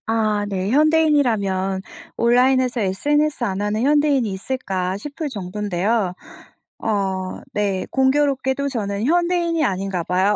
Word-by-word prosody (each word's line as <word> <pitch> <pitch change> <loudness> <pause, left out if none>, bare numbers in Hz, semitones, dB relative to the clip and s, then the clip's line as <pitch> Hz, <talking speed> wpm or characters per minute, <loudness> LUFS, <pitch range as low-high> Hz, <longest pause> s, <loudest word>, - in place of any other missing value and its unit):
아 215 -2 +1
네. 190 0 -2
현대인이라면 245 -11 +2 0.4
온라인에서 250 +1 +3
SNS 290 +9 +1
안 195 -3 -1
하는 210 +2 -1
현대인이 290 -3 +3
있을까 190 -3 -3
싶을 295 +7 -5
정도인데요. 200 -1 -1 0.7
어 195 -3 -1 0.3
네 200 -3 -1
공교롭게도 270 0 +1
저는 205 -4 -2
현대인이 345 0 +1
아닌가 190 -4 -2
봐요. 190 +4 +1
225 Hz, 295 characters per minute, -21 LUFS, 195-280 Hz, 0.7 s, 온라인에서